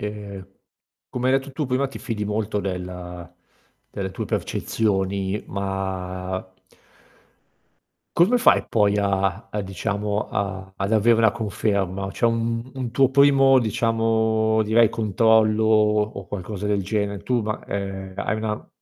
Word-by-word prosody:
ehm, 100 Hz, -2 st, -6 dB, 0.6 s
come 125 Hz, +1 st, -1 dB
hai 135 Hz, +1 st, +4 dB
detto 135 Hz, 0 st, -11 dB
tu 150 Hz, -1 st, -2 dB
prima 130 Hz, +2 st, 0 dB
ti -, -, -9 dB
fidi 105 Hz, -2 st, -3 dB
molto 105 Hz, 0 st, -1 dB
della 90 Hz, -2 st, -6 dB, 0.6 s
delle 95 Hz, -1 st, -4 dB
tue -, -, -4 dB
percezioni, 100 Hz, -2 st, -1 dB
ma 95 Hz, -1 st, -3 dB, 1.8 s
come 195 Hz, +9 st, +5 dB
fai 245 Hz, -, +4 dB
poi 105 Hz, -2 st, +2 dB
a 100 Hz, +1 st, 0 dB
a 105 Hz, -, -3 dB
diciamo 105 Hz, +2 st, -2 dB
a 95 Hz, -2 st, -3 dB
ad 100 Hz, +3 st, -2 dB
avere 115 Hz, +1 st, +4 dB
la 110 Hz, -2 st, +5 dB
conferma? 100 Hz, -3 st, -2 dB
C'è 120 Hz, -, +1 dB
un 115 Hz, +1 st, -1 dB
un 130 Hz, -3 st, -4 dB
tuo 135 Hz, +2 st, +3 dB
primo 135 Hz, -1 st, +6 dB
diciamo, 110 Hz, -1 st, +1 dB
direi 110 Hz, +1 st, +4 dB
controllo 110 Hz, 0 st, +3 dB
o 105 Hz, -1 st, +4 dB, 0.2 s
o 100 Hz, -, -9 dB
qualcosa 100 Hz, +1 st, -5 dB
del 100 Hz, -1 st, +1 dB
genere? 100 Hz, 0 st, -2 dB
Tu 125 Hz, -2 st, 0 dB
ma 110 Hz, 0 st, -4 dB
ehm, 95 Hz, -1 st, -5 dB
hai 110 Hz, -, -1 dB
una 110 Hz, -1 st, -4 dB
105 Hz, 135 wpm, -23 LUFS, 95-115 Hz, 1.8 s, primo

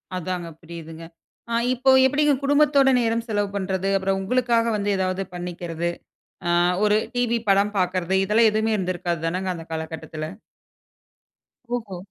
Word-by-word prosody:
அதாங்க 180 Hz, -1 st, -4 dB
புரியுதுங்க. 165 Hz, -1 st, -9 dB, 0.5 s
அ, -, -, -1 dB, 0.2 s
இப்போ 255 Hz, +2 st, +1 dB, 0.2 s
எப்புடிங்க 290 Hz, +2 st, +3 dB
குடும்பத்தோட 285 Hz, -1 st, +4 dB
நேரம் 230 Hz, 0 st, 0 dB
செலவு 205 Hz, -2 st, 0 dB
பண்றது, 190 Hz, -1 st, -1 dB
அப்பறம் 195 Hz, 0 st, -1 dB
உங்களுக்காக 235 Hz, +2 st, +1 dB
வந்து 205 Hz, 0 st, -2 dB
ஏதாவது 185 Hz, 0 st, -1 dB
பண்ணிக்கிறது, 175 Hz, -1 st, -4 dB, 0.6 s
அ -, -, +2 dB, 0.3 s
ஒரு 210 Hz, 0 st, +4 dB, 0.2 s
டிவி 240 Hz, -1 st, +1 dB
படம் 200 Hz, +2 st, +3 dB
பாக்குறது, 185 Hz, 0 st, 0 dB
இதெல்லாம் 220 Hz, +3 st, +4 dB
எதுவுமே 220 Hz, +1 st, +1 dB
இருந்திருக்காது 175 Hz, -2 st, -2 dB
தானங்க 185 Hz, +3 st, -2 dB
அந்த 165 Hz, -1 st, -8 dB
காலகட்டத்துல. 160 Hz, -1 st, -5 dB, 1.5 s
ஓஹோ! 210 Hz, -6 st, -6 dB
195 Hz, 130 wpm, -23 LUFS, 175-230 Hz, 1.5 s, குடும்பத்தோட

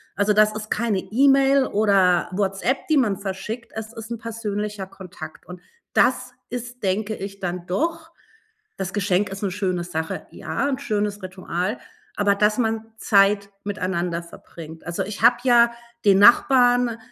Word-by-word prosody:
Also, 205 Hz, +1 st, +2 dB
das 215 Hz, 0 st, +4 dB
ist 215 Hz, 0 st, -7 dB
keine 215 Hz, -3 st, 0 dB
E-Mail 270 Hz, +6 st, +3 dB
oder 195 Hz, -4 st, +3 dB
WhatsApp, 195 Hz, +7 st, -1 dB
die 310 Hz, -, +3 dB
man 215 Hz, -8 st, +2 dB
verschickt. 210 Hz, +5 st, -6 dB
Es 220 Hz, +1 st, -6 dB
ist 225 Hz, 0 st, -9 dB
'n 235 Hz, -, -3 dB
persönlicher 210 Hz, -3 st, -4 dB
Kontakt 180 Hz, -5 st, -11 dB
und 180 Hz, 0 st, -10 dB, 0.3 s
das 250 Hz, 0 st, +2 dB, 0.2 s
ist, 245 Hz, 0 st, -7 dB
denke 205 Hz, +3 st, -1 dB
ich, 195 Hz, 0 st, -7 dB
dann 175 Hz, -1 st, -4 dB
doch 325 Hz, -, -2 dB, 0.7 s
das 190 Hz, -1 st, -4 dB
Geschenk 205 Hz, -1 st, +1 dB
ist 195 Hz, +1 st, -7 dB
'ne 195 Hz, -, -1 dB
schöne 185 Hz, -2 st, -2 dB
Sache, 160 Hz, -2 st, -4 dB
ja, -, -, -3 dB
'n 270 Hz, -1 st, -2 dB
schönes 210 Hz, -5 st, -2 dB
Ritual, 185 Hz, +3 st, -3 dB, 0.4 s
aber 205 Hz, -1 st, +3 dB
dass 210 Hz, +1 st, +2 dB
man 225 Hz, -2 st, -2 dB
Zeit 200 Hz, -1 st, +3 dB
miteinander 180 Hz, -3 st, -2 dB
verbringt. 165 Hz, -1 st, -12 dB
Also, 170 Hz, 0 st, -2 dB
ich 205 Hz, 0 st, -7 dB
habe 240 Hz, +1 st, +6 dB
ja 235 Hz, -2 st, +5 dB, 0.3 s
den 195 Hz, -1 st, +6 dB
Nachbarn, 245 Hz, +1 st, +5 dB
205 Hz, 155 wpm, -23 LUFS, 190-235 Hz, 0.7 s, habe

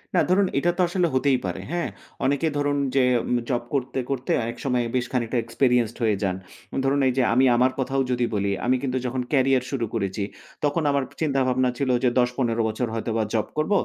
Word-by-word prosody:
না 175 Hz, -, +5 dB
ধরুন, 190 Hz, +1 st, +4 dB
এটা 175 Hz, +4 st, +2 dB
তো -, -, +2 dB
আসলে 175 Hz, 0 st, +1 dB
হতেই 130 Hz, 0 st, +3 dB
পারে। 90 Hz, 0 st, -3 dB
হ্যাঁ? 175 Hz, 0 st, -1 dB, 0.4 s
অনেকে 140 Hz, +4 st, +1 dB
ধরুন, 145 Hz, 0 st, +1 dB, 0.2 s
যে 135 Hz, -, +5 dB, 0.2 s
উম 125 Hz, -, +1 dB
জব 120 Hz, -2 st, 0 dB
করতে, 135 Hz, -1 st, -1 dB
করতে 130 Hz, -2 st, -2 dB
অনেক 115 Hz, +1 st, -4 dB
সময় 125 Hz, -2 st, +1 dB
বেশ 125 Hz, -1 st, +1 dB
খানিকটা 125 Hz, -1 st, -1 dB
এক্সপেরিয়েন্সড 120 Hz, 0 st, +1 dB
হয়ে 110 Hz, -2 st, +3 dB
যান। 95 Hz, -2 st, 0 dB, 0.5 s
ধরুন, 140 Hz, +1 st, +2 dB
এই 130 Hz, -, +2 dB
যে 130 Hz, -, +4 dB
আমি 130 Hz, +3 st, +4 dB
আমার 125 Hz, +2 st, +3 dB
কথাও 135 Hz, +1 st, 0 dB
যদি 125 Hz, -1 st, +1 dB
বলি। 100 Hz, 0 st, 0 dB
আমি 125 Hz, +1 st, +3 dB
কিন্তু 130 Hz, -1 st, -1 dB
যখন 125 Hz, +1 st, -1 dB
ক্যারিয়ার 135 Hz, -2 st, +3 dB
শুরু 125 Hz, -5 st, -1 dB
করেছি, 100 Hz, -2 st, -2 dB, 0.4 s
তখন 150 Hz, +3 st, +1 dB
আমার 140 Hz, -1 st, +1 dB, 0.2 s
চিন্তাভাবনা 130 Hz, -4 st, +2 dB
ছিল 140 Hz, -2 st, -1 dB
যে 125 Hz, -, +5 dB
১০-১৫ 125 Hz, -2 st, +1 dB
বছর 120 Hz, +3 st, -2 dB
হয়তোবা 115 Hz, 0 st, -1 dB
জব 110 Hz, -2 st, 0 dB
করব। 155 Hz, +6 st, 0 dB
130 Hz, 200 wpm, -24 LUFS, 120-140 Hz, 0.5 s, না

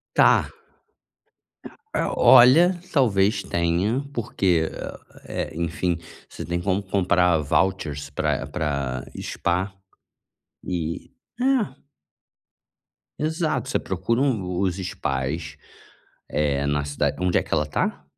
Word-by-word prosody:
Tá -, -, +5 dB, 1.4 s
Ah, -, -, 0 dB
olha, 130 Hz, +9 st, +7 dB, 0.2 s
talvez 105 Hz, -, +2 dB
tenha, 85 Hz, +9 st, 0 dB
porque, 95 Hz, -9 st, +1 dB, 0.6 s
eh, -, -, -3 dB
enfim, 85 Hz, +1 st, -1 dB, 0.3 s
você -, -, -9 dB
tem 85 Hz, 0 st, -2 dB
como 95 Hz, +2 st, 0 dB
comprar 90 Hz, -3 st, +2 dB
vouchers 75 Hz, -2 st, 0 dB
para 70 Hz, -, -1 dB
para 70 Hz, -6 st, -2 dB, 0.2 s
spa, 90 Hz, +3 st, -1 dB, 1.0 s
eh 85 Hz, -3 st, -3 dB, 0.3 s
é. 245 Hz, -, +1 dB, 1.4 s
Exato, 155 Hz, -2 st, -1 dB
você -, -, +1 dB
procura 95 Hz, +6 st, -1 dB
um 95 Hz, -10 st, -1 dB
os 95 Hz, -3 st, 0 dB
spas, 75 Hz, -3 st, -3 dB, 0.7 s
eh, 70 Hz, -1 st, 0 dB
na 70 Hz, 0 st, 0 dB
cidade 70 Hz, 0 st, -1 dB
onde 90 Hz, -1 st, +2 dB
é -, -, 0 dB
que -, -, -16 dB
ela 75 Hz, -, +2 dB
tá? 75 Hz, -, -2 dB
90 Hz, 105 wpm, -24 LUFS, 75-110 Hz, 1.4 s, olha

